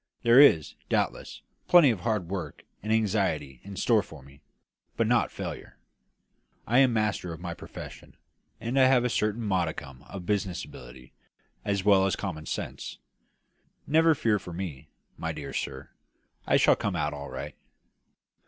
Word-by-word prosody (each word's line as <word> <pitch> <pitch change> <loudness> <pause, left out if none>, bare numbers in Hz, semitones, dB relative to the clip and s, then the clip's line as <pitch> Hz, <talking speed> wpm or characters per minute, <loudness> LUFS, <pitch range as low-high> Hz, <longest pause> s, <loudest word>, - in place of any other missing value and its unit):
"There 120 +2 +7
is, 85 - +6 0.2
doubtless, - - -2 0.2
plenty 170 -7 +7
of 110 - -3
hard 105 -3 -1
work 85 -6 -5 0.2
and 110 - -3
anxiety 95 - 0
in 100 0 -9
store 110 +2 +3
for 80 -7 -13
me, 70 +2 -18 0.6
but - - +2
not - - +2
failure. - - -7 0.9
I 120 +4 +3
am 135 -2 +5
master 105 -5 -1
of 80 - -9
my 85 -1 -5
profession, - - -11 0.4
and 125 +4 -1
I 130 - +7
have 125 -2 +4
a - - +1
certain 105 +2 0
modicum 80 -9 -2
of 95 -3 -7
business 100 -2 -1
ability, 60 +1 -13 0.5
as 100 -2 -1
well 95 -2 +5
as 95 - 0
common 80 -6 -5
sense. - - -5 0.9
Never 160 +2 +4
fear 110 -5 +1
for 90 -1 -9
me, 80 -6 -6 0.3
my 80 - -2
dear 70 -3 -7
sir; 65 -1 -5 0.6
I - - +4
shall - - +5
come - - -2
out 75 0 -1
all 70 -1 -7
right." 75 +3 -6
95 Hz, 160 wpm, -28 LUFS, 75-110 Hz, 0.9 s, There